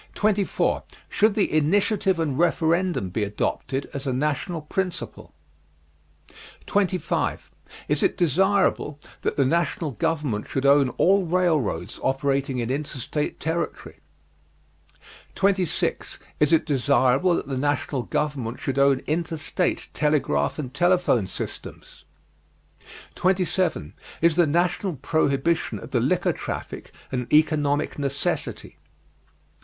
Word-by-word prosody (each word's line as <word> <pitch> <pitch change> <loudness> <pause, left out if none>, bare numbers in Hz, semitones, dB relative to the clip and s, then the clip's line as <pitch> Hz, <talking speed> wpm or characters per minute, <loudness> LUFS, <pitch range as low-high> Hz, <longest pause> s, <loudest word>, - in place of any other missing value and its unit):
Should 215 0 +3
the 205 - +1
Initiative 190 +4 +2
and 155 -5 0
Referendum 170 - +1
be 105 +3 -1
adopted 130 +6 -2
as 140 0 -5
a - - +1
national 150 +4 -1
principle? 180 +1 -4 1.3
25. 190 -3 -1 0.4
Is - - +1
it - - +1
desirable 180 -3 +2 0.2
that - - -2
the 140 - +3
national 165 +1 0
government 145 -6 -2
should 135 0 -2
own 140 -1 +5
all 190 0 +3
railroads 170 - 0
operating 135 0 0
in 120 0 -2
interstate 145 +1 -3
territory? 165 +2 -3 1.4
26. 190 -4 0 0.2
Is 150 +1 +3
it 165 - +4
desirable 140 +3 +3
that - - -3
the 135 - -3
national 140 0 -1
government 140 -4 -2
should 135 0 -2
own 140 -1 +3
interstate 160 -1 -1
telegraph 135 - +1
and 130 -4 -5
telephone 175 - +2
systems? - - -7 1.1
27. 185 - 0 0.3
Is 165 -1 +3
the 175 -2 +4
national 175 +3 0
prohibition 150 +3 0
of - - -10
the - - +2
liquor - - +1
traffic - - -6 0.2
an 125 -2 -2
economic 150 -2 +2
necessity? 140 -1 -3
150 Hz, 110 wpm, -24 LUFS, 135-175 Hz, 1.4 s, own